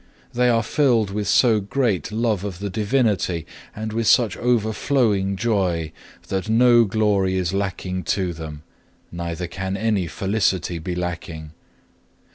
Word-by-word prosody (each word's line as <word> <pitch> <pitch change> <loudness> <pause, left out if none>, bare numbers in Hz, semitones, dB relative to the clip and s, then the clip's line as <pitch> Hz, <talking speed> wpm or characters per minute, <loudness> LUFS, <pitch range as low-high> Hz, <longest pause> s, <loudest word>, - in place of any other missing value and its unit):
They 125 +1 +3
are 115 -1 +2
filled 120 -9 +2
with 105 +1 -3
so 115 -4 +4
great 105 - -1
love 110 -3 0
of 100 -4 -5
the 100 +1 -5
Divinity, 105 - 0 0.3
and 110 0 -5
with 115 -1 -1
such 115 -6 +4
overflowing 110 -3 +1
joy, 95 -7 0 0.4
that 95 +2 -2
no 120 +1 +5
glory 100 -2 +1
is 90 -1 -1
lacking 95 -2 -3
to 90 0 0
them, 80 -2 -8 0.5
neither 85 0 -4
can 95 +2 -4
any 105 -4 0
felicity 95 -3 -1
be 90 +2 -4
lacking. 85 -3 -5
100 Hz, 135 wpm, -22 LUFS, 90-110 Hz, 0.5 s, no